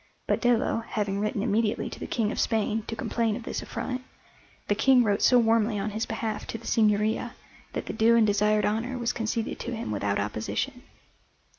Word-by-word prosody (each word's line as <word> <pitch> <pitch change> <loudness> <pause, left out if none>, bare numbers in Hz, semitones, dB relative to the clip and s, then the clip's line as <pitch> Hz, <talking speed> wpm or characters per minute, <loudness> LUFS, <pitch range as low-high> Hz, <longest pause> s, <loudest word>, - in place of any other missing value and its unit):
But - - 0
Dello 240 -2 +2
having 210 -3 -2
written 210 -1 -1
immediately 220 -1 +1
to - - -8
the - - -5
King 215 -2 0
of - - -4
Spain 220 0 +1
to 225 - -4
complain 225 -1 -1
of 235 - -6
this - - -4
affront, 255 0 -4 0.7
the - - +3
King 250 +3 +5
wrote 205 -3 +1
so 250 - +6
warmly 225 -2 +3
on 200 +2 -2
his 220 +2 -2
behalf 225 -1 -3
to - - -4
the 230 - -14
Signoria 215 +2 +1 0.4
that - - -3
the - - -5
due 225 +1 +4
and 230 -2 +5
desired 210 +1 +2
honour 230 +5 -1
was 240 0 -1
conceded 225 0 -2
to 240 0 -4
him 225 - -4
without 100 -1 0
opposition. 105 +2 -3
220 Hz, 195 wpm, -27 LUFS, 210-230 Hz, 0.7 s, so